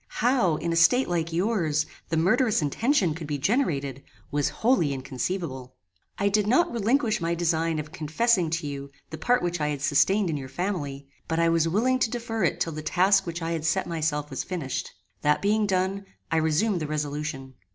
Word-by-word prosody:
How, 235 -9 +3
in 165 +2 -2
a - - -1
state 245 +11 +4
like 170 -1 -1
yours, 170 -4 +1 0.2
the 165 - 0
murderous 205 - +2
intention 195 - +1
could 160 -1 -7
be 145 -1 -2
generated, 140 - 0 0.3
was 145 -1 +1
wholly 220 - +1
inconceivable. 130 0 -4 0.4
"I 200 - +1
did 205 0 +2
not 340 +10 +3
relinquish 230 0 +1
my 170 +1 0
design 165 -1 0
of 150 0 -5
confessing 170 +4 +1
to 165 0 -2
you 140 -1 -5 0.2
the 160 - -6
part 245 -5 +2
which 175 -2 -1
I 150 - +1
had 145 -1 -3
sustained 190 +6 +3
in 150 - -2
your 135 -2 -7
family, 145 -5 -3 0.2
but 160 - -1
I 165 0 +3
was 165 0 +2
willing 245 +9 +2
to 245 - +2
defer 225 -2 -3
it 170 - +1
till 165 - -1
the 155 - -5
task 190 +4 +3
which 170 0 -4
I 165 - -2
had 165 -2 -2
set 180 +4 +1
myself 150 -3 -2
was 135 - -3
finished. 160 -8 -4 0.3
That 150 0 +3
being 210 +1 +1
done, 190 +1 0 0.3
I 165 - +2
resumed 160 +6 +1
the 155 - -3
resolution. 150 -2 -4
165 Hz, 195 wpm, -26 LUFS, 150-200 Hz, 0.4 s, state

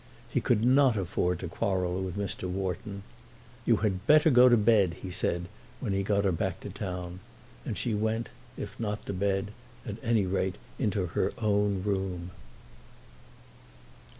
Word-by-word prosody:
He - - 0
could 115 -1 +2
not 130 -1 +5
afford 90 -1 0
to 90 - -3
quarrel 90 +1 -1
with 95 0 -4
Mr. 100 -2 -3
Wharton. 95 +2 -3 0.6
"You - - +5
had 95 +1 -1
better 155 +1 +6
go 125 0 +8
to 120 - +6
bed," 105 -5 +4
he 95 - -5
said, 85 0 0 0.3
when 100 - -2
he 95 - +1
got 100 0 +1
her 95 - +3
back 90 +2 -2
to 100 - -7
town; 90 -2 -5 0.5
and 110 -6 -2
she 110 +4 0
went, 110 +2 -1 0.3
if - - -7
not 105 -2 -3
to - - -3
bed, 95 +1 0 0.3
at 105 -3 -5
any 115 -4 +2
rate 95 0 0 0.2
into 105 -6 0
her 85 - 0
own 105 -3 +1
room. 95 -3 -2
100 Hz, 160 wpm, -29 LUFS, 90-110 Hz, 0.6 s, go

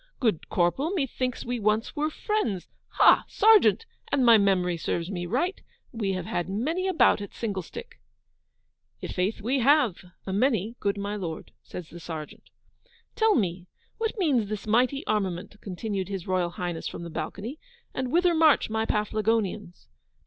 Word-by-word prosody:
Good 220 - 0
Corporal, 180 - +1
methinks 260 -5 -2
we 245 0 -2
once 215 +1 0
were 300 +1 0
friends. 310 - -2 0.3
Ha, - - +6
Sergeant, 400 - +5 0.3
an' 270 -3 +3
my 235 -1 +8
memory 190 -4 +3
serves 170 +2 -3
me 175 -2 -4
right, 315 - -1 0.3
we 210 -5 -2
have 185 -2 -3
had 175 0 -2
many 310 - -1
a 380 - 0
bout 270 - +4
at 200 - -8
singlestick.' 215 - -6 1.0
'I' - - -2
faith, 190 +4 -1
we 255 +6 0
have, 260 - +4 0.3
a 190 - -3
many, 225 0 +1
good 200 0 0
my 200 +1 -3
Lord,' 170 -6 -6
says 175 -3 -9
the 175 - -9
Sergeant. 160 -2 -8 0.7
'Tell 445 -2 +4
me, 180 -5 -1 0.3
what 450 +1 -2
means 275 - +2
this 215 -1 -4
mighty 250 +7 +2
armament,' 200 -1 -2
continued 195 0 -4
His 195 -3 -4
Royal 185 -2 0
Highness 175 -1 -4
from - - -6
the 170 - -7
balcony, 200 - -5 0.3
'and 255 -1 -3
whither 350 +2 +4
march 315 -8 +4
my 220 0 0
Paflagonians? 210 -3 -1
210 Hz, 160 wpm, -27 LUFS, 185-260 Hz, 1.0 s, my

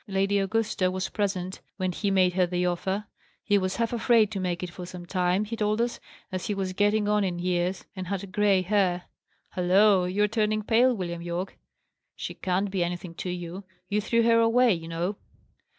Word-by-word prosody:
Lady 195 0 +1
Augusta 200 -1 0
was 185 +1 -3
present 190 -3 -2 0.2
when 185 -2 -1
he 200 +3 -1
made 185 -2 +3
her 180 -1 +2
the 180 0 -1
offer. 190 +3 -1 0.4
He 205 -2 +3
was 185 0 -2
half 230 0 -1
afraid 230 -2 +3
to 200 - -3
make 180 -1 -2
it 180 - -5
for 180 - -8
some 180 0 -8
time, 180 +2 +1
he 225 +2 -4
told 215 0 0
us, 235 0 -1 0.3
as 185 -1 -3
he 205 - -1
was 190 -1 -2
getting 205 +2 +2
on 210 0 +2
in 180 -2 -1
years, 180 +1 -1
and 185 -2 -5
had 195 0 -4
grey 200 -2 +3
hair. 185 -2 +1 0.5
Halloa! 185 +1 +4
you 200 +3 +1
are - - +4
turning 215 0 0
pale, 245 +4 +4
William 170 -4 -4
Yorke. 175 +2 -4 0.6
She - - -5
can't 190 +2 -1
be 190 -3 +1
anything 175 0 -4
to 180 - -5
you! 180 +2 -5 0.3
You 210 +1 +1
threw 230 +2 +2
her 230 0 +5
away, 230 +1 +4
you 165 -2 -5
know." 170 +5 -2
190 Hz, 200 wpm, -27 LUFS, 180-210 Hz, 0.6 s, her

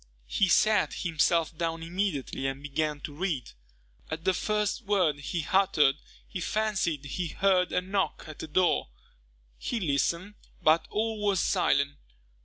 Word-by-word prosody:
He 190 - +1
sat 215 +3 +3
himself 165 0 +1
down 165 0 -2
immediately 165 -7 -2
and 135 +1 -4
began 150 0 -2
to 145 - -6
read. 155 -5 -2 0.6
At 160 +1 -5
the 190 - +4
first 210 +4 0
word 190 -9 +2
he 160 +3 -3
uttered, 160 -8 +4 0.3
he 185 - -5
fancied 190 -9 0
he 170 +5 -3
heard 185 +2 +2
a - - +1
knock 195 +1 -1
at 155 -1 -10
the - - -5
door. 175 +3 +2 0.7
He 240 - -2
listened, 170 +4 0 0.3
but 160 +1 +4
all 220 0 -1
was 200 -3 +2
silent. 140 -3 +2
170 Hz, 145 wpm, -28 LUFS, 150-195 Hz, 0.7 s, the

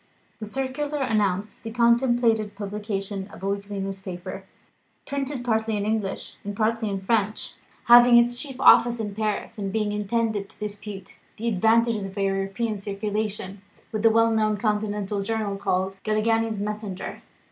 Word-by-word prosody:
The 215 - -5
circular 270 +4 -2
announced 210 -4 0
the 225 - -6
contemplated 235 -2 +2
publication 200 -1 -4
of 205 -2 -13
a - - -1
weekly 200 0 -3
newspaper, 195 -2 -6 0.6
printed 275 -2 -3
partly 220 -2 +1
in 205 - -2
English, 215 -2 -2
and 205 0 -5
partly 225 0 +1
in 195 -1 -3
French, 215 +1 0 0.3
having 240 0 +8
its 240 0 +4
chief 265 +1 -6
office 240 0 +6
in 210 -2 -3
Paris, 215 0 -3
and 195 -1 -2
being 210 -1 0
intended 210 -1 -1
to - - -14
dispute 205 -2 -7 0.2
the 230 - -3
advantages 225 +1 +2
of 195 +1 -9
a 200 - +1
European 195 +3 -1
circulation 200 -1 -3 0.3
with 215 - -2
the 225 - +6
well 230 +1 +4
known 215 -1 +2
Continental 210 -1 -1
journal 210 -1 -2
called 190 -1 -1
"Galignani's 220 0 +1
Messenger." 210 -2 -5
215 Hz, 150 wpm, -25 LUFS, 200-230 Hz, 0.6 s, having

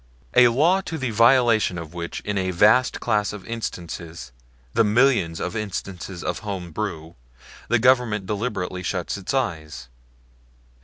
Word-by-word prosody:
A 125 0 +7
law 160 +11 +3
to 165 -4 -5
the 130 -5 -2
violation 115 -4 +4
of 85 -1 -8
which 85 -1 -5
in 105 - -3
a 95 -1 0
vast 105 +8 +3
class 105 -3 0
of 105 -3 -9
instances 85 - -6 0.4
the 115 - +4
millions 110 -7 +2
of 90 - -4
instances 95 -3 -5
of - - -2
home 95 -5 -6
brew 85 -4 -5 0.5
the 120 - +3
Government 120 -4 +2
deliberately 100 -3 -3
shuts 90 -1 -3
its 100 -2 -5
eyes? 80 - -3
105 Hz, 145 wpm, -23 LUFS, 90-120 Hz, 0.5 s, A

